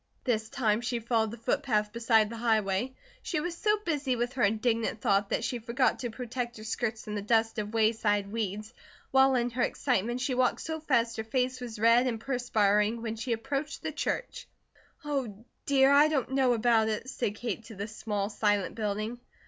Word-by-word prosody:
This 220 -3 0
time 220 -3 +1
she 240 0 -1
followed 225 -1 +1
the 230 - -8
footpath 225 -4 0
beside 230 -2 +3
the 230 - -6
highway. 220 +1 0 0.3
She 325 - -2
was 340 +2 -3
so 420 +4 +2
busy 290 -6 0
with 240 +1 -2
her 265 - -3
indignant 225 +2 +1
thought 200 0 +2
that - - -1
she 245 - -2
forgot 235 +3 +1
to 240 - -3
protect 240 0 -5
her 215 - -9
skirts 220 0 -2
from 210 - -6
the 205 - -2
dust 225 +1 +1
of 210 +1 -4
wayside 215 -2 +2
weeds, 215 0 -3 0.4
while 265 0 +5
in 240 0 0
her 245 +2 -2
excitement 240 -2 0
she 260 +1 -1
walked 250 0 +1
so 320 0 -4
fast 235 -7 +1
her 220 - -2
face 255 +2 -1
was 235 -3 -6
red 230 +3 +5
and 230 -3 -2
perspiring 225 -3 +1
when 225 -1 -3
she 225 +2 -4
approached 275 +7 -3
the - - -2
church. - - -3 0.6
"Oh, 245 -7 -3 0.2
dear, 270 -1 +5
I 285 +2 +7
don't 275 -5 -1
know 265 -2 +3
about 225 -1 +3
it," 220 +3 -3
said 225 -5 -2
Kate 230 0 -4
to 225 -1 -10
the 200 +2 -4
small, 210 -2 -3
silent 205 -2 +1
building. 215 +2 -3
230 Hz, 195 wpm, -29 LUFS, 215-255 Hz, 0.6 s, I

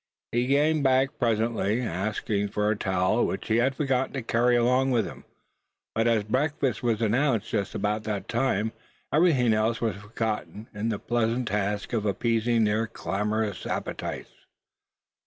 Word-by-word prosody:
He 120 +1 +1
came 150 +3 +3
back 135 +1 +2
presently, 115 -2 +1
asking 105 +1 -1
for 105 +1 0
a - - +1
towel, 95 +3 +1
which 95 - -3
he 110 - +3
had 130 +3 +2
forgotten 130 -2 0
to 135 -4 -3
carry 120 +2 +2
along 125 +3 +3
with 120 -5 +2
him. - - -9 0.7
But 115 +1 +1
as 115 -3 +3
breakfast 135 +4 0
was 115 -2 0
announced 115 0 +1
just 100 - -2
about 105 +2 0
that 105 -2 -3
time, 115 -3 0 0.4
everything 150 -8 +4
else 110 +2 +1
was 110 -5 -1
forgotten 105 +1 -4
in 105 +2 -2
the 110 - -1
pleasant 120 +1 0
task 105 +2 -2
of 110 -2 0
appeasing 115 +2 +1
their 110 +1 +1
clamorous 105 -1 -2
appetites. - - -4
115 Hz, 155 wpm, -26 LUFS, 105-125 Hz, 0.7 s, everything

